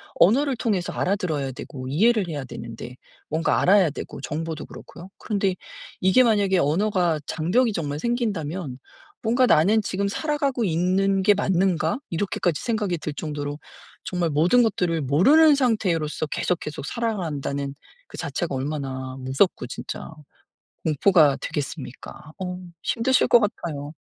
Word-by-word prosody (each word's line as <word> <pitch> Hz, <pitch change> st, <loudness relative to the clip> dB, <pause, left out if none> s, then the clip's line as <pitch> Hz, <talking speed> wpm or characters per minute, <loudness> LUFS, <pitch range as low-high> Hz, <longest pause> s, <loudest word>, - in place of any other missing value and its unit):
언어를 265 Hz, +8 st, +4 dB
통해서 200 Hz, -7 st, -1 dB
알아들어야 160 Hz, -8 st, -1 dB
되고 130 Hz, 0 st, -8 dB
이해를 210 Hz, -, +3 dB
해야 145 Hz, -4 st, -4 dB
되는데, 120 Hz, +1 st, -8 dB, 0.3 s
뭔가 160 Hz, +2 st, +1 dB
알아야 190 Hz, -3 st, +5 dB
되고 140 Hz, -, -7 dB
정보도 160 Hz, +3 st, -4 dB
그렇고요. 180 Hz, +3 st, -12 dB
그런데 195 Hz, -3 st, -1 dB, 0.5 s
이게 190 Hz, +8 st, +5 dB
만약에 205 Hz, -5 st, +3 dB
언어가 175 Hz, +1 st, +1 dB
장벽이 210 Hz, +9 st, +1 dB
정말 150 Hz, -4 st, -3 dB
생긴다면 180 Hz, -, -2 dB, 0.4 s
뭔가 245 Hz, +3 st, +3 dB
'나는 205 Hz, +8 st, +4 dB
지금 200 Hz, +1 st, -1 dB
살아가고 280 Hz, -2 st, -1 dB
있는 190 Hz, +3 st, +1 dB
게 205 Hz, -, +6 dB
맞는가?' 185 Hz, -, +1 dB
이렇게까지 175 Hz, -2 st, -1 dB
생각이 210 Hz, -7 st, -1 dB
들 150 Hz, -, -4 dB
정도로 145 Hz, -1 st, -5 dB, 0.5 s
정말 175 Hz, -3 st, -1 dB
모든 175 Hz, +12 st, +4 dB
것들을 175 Hz, -7 st, 0 dB
모르는 275 Hz, -, +5 dB
상태로서 185 Hz, -, 0 dB
계속, 175 Hz, +3 st, -1 dB
계속 150 Hz, -2 st, -6 dB
살아간다는 150 Hz, -, -3 dB, 0.3 s
그 -, -, -11 dB
자체가 165 Hz, -6 st, -3 dB
얼마나 130 Hz, -2 st, -4 dB
무섭고 130 Hz, +2 st, +1 dB
진짜 -, -, -7 dB, 0.8 s
공포가 155 Hz, -2 st, +4 dB
되겠습니까? 145 Hz, +1 st, -6 dB
어 180 Hz, 0 st, -4 dB, 0.2 s
힘드실 250 Hz, +2 st, +2 dB
것 240 Hz, -, +7 dB
같아요. 160 Hz, -8 st, -3 dB
175 Hz, 335 characters per minute, -24 LUFS, 150-210 Hz, 0.8 s, 것